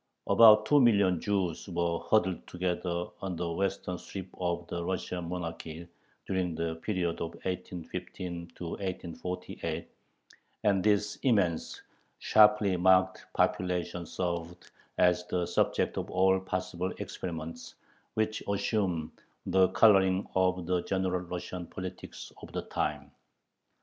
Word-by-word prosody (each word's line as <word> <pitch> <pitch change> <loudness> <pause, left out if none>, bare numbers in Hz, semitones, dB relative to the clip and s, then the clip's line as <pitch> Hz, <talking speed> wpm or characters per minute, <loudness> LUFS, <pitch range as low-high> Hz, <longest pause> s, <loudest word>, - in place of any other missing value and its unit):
" - - -53
About 110 -2 +8
two 145 +4 +5
million 100 -7 +4
Jews 95 -5 -1
were 85 -1 0
huddled 90 +1 +1
together 90 -1 -2 0.2
on 95 -2 -3
the 85 0 -2
western 95 0 -2
strip 95 -1 -7
of 85 -1 -1
the 85 - -3
Russian 90 -1 -3
monarchy 85 -1 -5 0.4
during 90 -3 -1
the 80 0 -2
period 90 -2 -2
of 85 0 -4
1815 90 -1 -5
1848, 90 0 -5 0.8
and 100 -3 +3
this 105 0 +2
immense, 100 - +1 0.3
sharply 105 -2 +5
marked 95 +1 +3
population 90 -1 0
served 85 0 -4 0.3
as 90 0 +4
the 90 -1 0
subject - - +1
of - - -5
all 95 +1 +3
possible 90 -1 -3
experiments, 80 -1 -6 0.4
which 110 0 0
assumed 95 -6 0 0.3
the 95 -1 +4
coloring 95 -1 +4
of 90 -1 +1
the 90 0 +1
general 95 -1 0
Russian 90 0 -6
politics 95 +1 -8
of - - -10
the - - -2
time. - - -3
90 Hz, 120 wpm, -30 LUFS, 85-95 Hz, 0.8 s, About